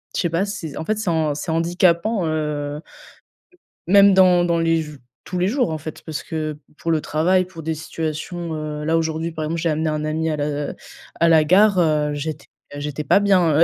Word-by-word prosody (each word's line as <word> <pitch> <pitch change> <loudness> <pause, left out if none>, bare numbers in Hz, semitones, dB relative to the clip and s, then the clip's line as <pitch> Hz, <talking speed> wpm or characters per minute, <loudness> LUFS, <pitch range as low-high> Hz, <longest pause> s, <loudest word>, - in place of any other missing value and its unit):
je - - +1
sais 170 - 0
pas, 170 +4 0
c'est 165 -8 -6
en 160 - -5
fait 215 +3 0
c'est 215 -5 -2
han 155 -3 0
c'est 150 - -4
handicapant, 175 +4 +1
heu 150 -2 -2 1.1
même 200 +1 +6
dans 180 -2 +5
dans 170 -1 +1
les 165 -1 +2
jou 150 -2 -10 0.3
tous 180 - -4
les 180 +1 +1
jours 245 - 0
en 155 - -3
fait, 155 +1 -8
parce 155 -2 -5
que 155 -2 -4 0.2
pour 165 - -3
le 160 - +2
travail, 180 +6 +1
pour 170 -3 -11
des 160 +1 -2
situations, 160 +2 -5
heu, 150 -1 -5
là 160 +1 +2
aujourd'hui, 160 0 -1
par 155 -1 -4
exemple, 165 +2 -2
j'ai 170 - 0
amené 155 0 0
un 155 0 -2
ami 160 +1 -1
à 155 - -1
la, 145 0 -1 0.3
heu - - -11 0.5
à 170 - +5
la 160 -2 +5
gare, 195 +4 +4
heu, 150 -3 +2
j'étais 145 0 -5 0.3
j'étais 150 +1 -4
pas 170 - +4
bien. 180 -7 +3
160 Hz, 215 wpm, -21 LUFS, 155-175 Hz, 1.1 s, même